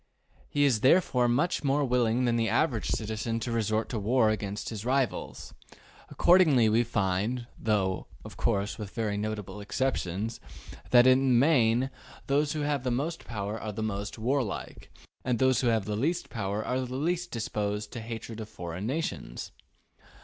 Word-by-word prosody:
He 145 - +1
is 130 -6 +3
therefore 130 -2 +4
much 145 +10 +1
more 140 +1 +2
willing 125 -1 +2
than 120 -1 +2
the 115 -1 +1
average 125 -9 +1
citizen 110 +1 -2
to 120 - -3
resort 110 -1 0
to 115 - -2
war 110 +1 +3
against 105 -1 -3
his 110 -3 -6
rivals. 130 +1 -1 0.6
Accordingly 160 -10 +5
we 115 +2 +3
find, 110 +2 -1
though, 100 -4 0 0.2
of - - -9
course, 100 +3 -1
with 105 0 -7
very 110 -3 -1
notable 105 -1 -4
exceptions, 110 -2 -2 0.5
that 120 0 +7
in 130 0 +6
the 135 -1 +2
main 125 -2 +3 0.3
those 145 +1 +1
who 155 - -2
have 145 -3 0
most 150 +7 -2
power 105 -1 -4
are 105 -1 -4
most 105 -1 -3
warlike, 120 -1 -2 0.3
and 125 -2 0
those 130 0 +3
who 125 - +1
have 110 -4 +1
least 140 +12 -1
power 105 -2 -2
are 130 - 0
least 155 +8 -2
disposed 105 -2 -3
to 120 - -5
hatred 115 0 -7
of 110 -1 -7
foreign 90 0 -5
nations. 135 - -4
115 Hz, 155 wpm, -28 LUFS, 105-130 Hz, 0.6 s, that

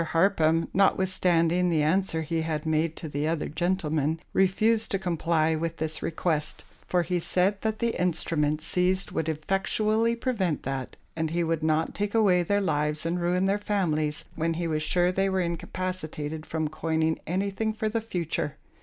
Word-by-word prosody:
Harpham, 165 -1 +2
notwithstanding 180 -2 +3
the 160 -3 +2
answer 165 0 +1
he 165 +1 -1
had 160 -1 -2
made 160 +1 +1
to 160 - -6
the 145 +1 -2
other 160 -1 -1
gentleman, 160 -3 0
refused 215 +4 +2
to 195 - 0
comply 165 -3 +1
with 165 +1 -3
this 155 0 -3
request; 160 -2 -1 0.2
for 180 -1 +2
he 180 +1 -1
said 185 +4 +1
that 220 -1 -1
the 235 0 0
instruments 155 -3 0
seized 185 +1 +1
would 160 0 -1
effectually 210 +8 +1
prevent 215 - -1
that, 135 -1 -4 0.2
and 160 -1 -1
he 170 +2 0
would 165 -1 0
not 160 +1 +1
take 205 +1 -2
away 195 -5 +4
their 200 +4 +1
lives 150 -3 0
and 175 +1 -1
ruin 180 +2 +1
their 200 +1 +1
families, 155 -8 0
when 165 0 0
he 170 0 -2
was 155 -1 -1
sure 175 +3 +2
they 195 +1 +1
were 190 0 0
incapacitated 170 -3 -4
from 160 -1 -1
coining 160 +1 0
anything 200 +5 -1
for 220 0 -2
the 225 +1 -1
future. 170 -8 -3
170 Hz, 170 wpm, -27 LUFS, 155-190 Hz, 0.2 s, away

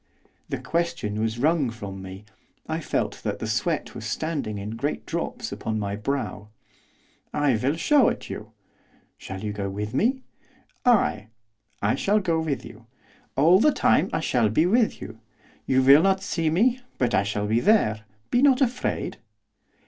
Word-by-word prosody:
The - - -2
question 170 -11 -2
was 110 +1 -1
wrung 150 0 +2
from 100 -4 -7
me; 95 +2 -9 0.4
I - - -2
felt - - -2
that - - -2
the - - -5
sweat - - -1
was - - -8
standing 110 -1 -3
in 100 +2 -5
great 140 +7 -3
drops - - -4
upon 110 -1 -3
my 100 -1 -2
brow. 105 -2 -3 0.9
'I 145 -5 +2
will 135 +7 0
show 270 - +4
it - - -5
you.' 105 +1 -7 0.7
'Shall 95 +1 -7
you 105 -1 -3
go 100 -1 -3
with 105 +3 -4
me?' 255 - +1 0.6
'Ay, 155 - +3 0.6
I 100 - +3
shall 210 +2 +2
go 170 -5 0
with 145 -6 -2
you. 115 +1 -13 0.5
All 165 +7 +5
the 300 - +5
time 185 - +2
I 160 - -1
shall 120 -8 +2
be 155 +10 +2
with 220 +5 +2
you. - - -9 0.5
You 130 0 +3
will 140 +3 +8
not 195 +1 +2
see 165 -5 0
me, 235 +10 +2 0.2
but 120 -2 0
I 95 - +4
shall 105 +1 -2
be 110 +2 +2
there. 120 - +3 0.3
Be 245 - +3
not 270 -2 +5
afraid. 250 -2 -1
135 Hz, 170 wpm, -25 LUFS, 105-180 Hz, 0.9 s, will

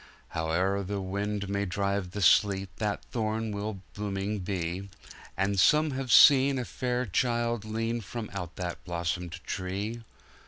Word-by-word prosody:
Howe'er 90 +5 0
the 100 +1 -3
wind 100 +1 -2
may 100 +1 -1
drive 100 0 -1
the 100 +2 -3
sleet, 95 0 +4
That 105 -2 -2
thorn 110 -1 -1
will 100 -1 -4
blooming 100 0 -2
be; 90 0 -3 0.5
And 95 0 +1
some 150 +8 +5
have 130 -2 -3
seen 135 +2 +8
a 125 - -2
fair 125 0 -2
Child 120 +2 0
lean 115 +2 -2
From 110 +3 -6
out 90 -3 -5
that 90 -1 -5
blossomed 85 0 -3
tree! 100 +5 -3
100 Hz, 145 wpm, -29 LUFS, 95-115 Hz, 0.5 s, seen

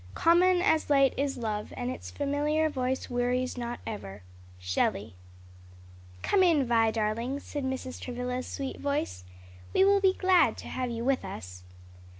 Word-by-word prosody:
Common 355 +2 +4
as 320 -7 +2
light 275 -2 +4
is 275 0 -1
love, 215 -3 -3
And 250 0 -2
its - - -7
familiar 295 +2 0
voice 260 -1 -2
wearies 250 +1 -1
not 240 -1 -4
ever." 100 - -7 0.3
Shelley. 90 +3 -1 1.1
"Come 395 - +3
in, 325 -7 +4
Vi, 230 -2 +3
darling," 230 +5 -1
said 290 0 -5
Mrs. 260 -1 -4
Travilla's 250 0 -4
sweet 275 -1 -5
voice, 280 - -2 0.5
"we 380 - +6
will 400 0 +4
be 380 -1 +4
glad 370 -1 +3
to - - -9
have 255 -1 -2
you 235 0 -4
with 270 0 +1
us." 90 - -8
255 Hz, 150 wpm, -29 LUFS, 230-295 Hz, 1.1 s, we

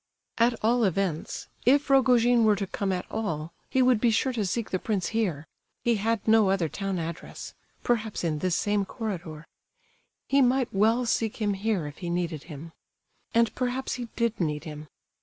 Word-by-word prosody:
At 235 +1 +4
all 235 +2 +3
events, 185 -4 -1 0.2
if 280 +4 +4
Rogojin 245 -3 +4
were 215 -1 +5
to 200 0 -2
come 195 +1 -2
at 180 -1 -2
all 170 -7 -3 0.2
he 260 - +3
would 250 -4 +3
be 240 - +4
sure 240 +4 +1
to 215 -5 -1
seek 230 +4 -2
the 185 - 0
prince 200 -4 -1
here—he 220 +3 -2
had 225 +1 -1
no 220 -2 +5
other 190 -4 +1
town 195 +4 -3
address—perhaps 210 +6 -4
in 155 -3 -1
this 180 0 0
same 205 +1 +1
corridor; 175 -8 -6 0.8
he 275 0 +4
might 255 0 +2
well 225 +5 +3
seek 225 -1 0
him 210 -2 0
here 195 -4 -1
if 145 0 -8
he 175 -2 -4
needed 170 -3 -2
him. 160 0 -9 0.6
And 230 -1 +3
perhaps 255 +1 -2
he 245 -1 -5
did 235 -1 0
need 150 -2 -1
him. 150 -2 -8
210 Hz, 175 wpm, -27 LUFS, 175-235 Hz, 0.8 s, were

